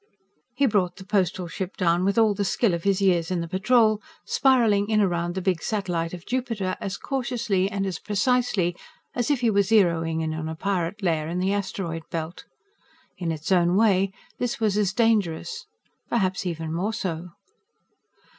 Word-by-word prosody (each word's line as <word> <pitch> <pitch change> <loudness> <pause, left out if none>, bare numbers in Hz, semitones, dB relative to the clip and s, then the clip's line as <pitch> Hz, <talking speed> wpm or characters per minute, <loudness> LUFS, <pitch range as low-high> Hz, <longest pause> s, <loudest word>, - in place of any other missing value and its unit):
_ - - -41 0.5
He 280 +2 +3
brought 200 -7 +1
the 190 - -11
Postal 185 -2 0
Ship 180 +3 -5
down 175 -1 +2
with 200 +3 +1
all 220 -2 +5
the 200 0 -1
skill 200 0 +1
of 170 +1 -3
his 200 0 +2
years 175 -4 +2
in 180 -2 0
the 170 - -3
Patrol, 215 +3 +3 0.2
spiralling 225 -6 +3
in 215 -1 +3
around 175 -3 0
the 190 - -3
big 180 -4 +1
satellite 180 -6 -2
of 175 -1 -9
Jupiter 230 -7 -2
as 195 - -3
cautiously 235 -8 -1
and 200 -1 -2
as 185 -4 -3
precisely 210 -4 +1 0.4
as 245 +1 -1
if 285 -4 +1
he 235 -2 +3
were 200 -1 +4
zeroing 170 -6 +2
in 160 -1 -2
on 160 0 -4
a 160 - -4
pirate 195 +2 -2
lair 160 -4 +1
in 170 +2 -3
the 190 +2 +1
asteroid 190 -4 -3
belt. 165 +1 -5 0.7
In 170 -3 -1
its 160 +3 -4
own 175 -1 +4
way, 195 -2 +3 0.3
this 245 -1 -2
was 215 -3 +1
as 205 -3 +2
dangerous, 225 - 0 0.4
perhaps 190 -4 0
even 160 -2 -4
more 195 +6 -1
so. 180 -3 -4
190 Hz, 185 wpm, -25 LUFS, 175-215 Hz, 0.7 s, all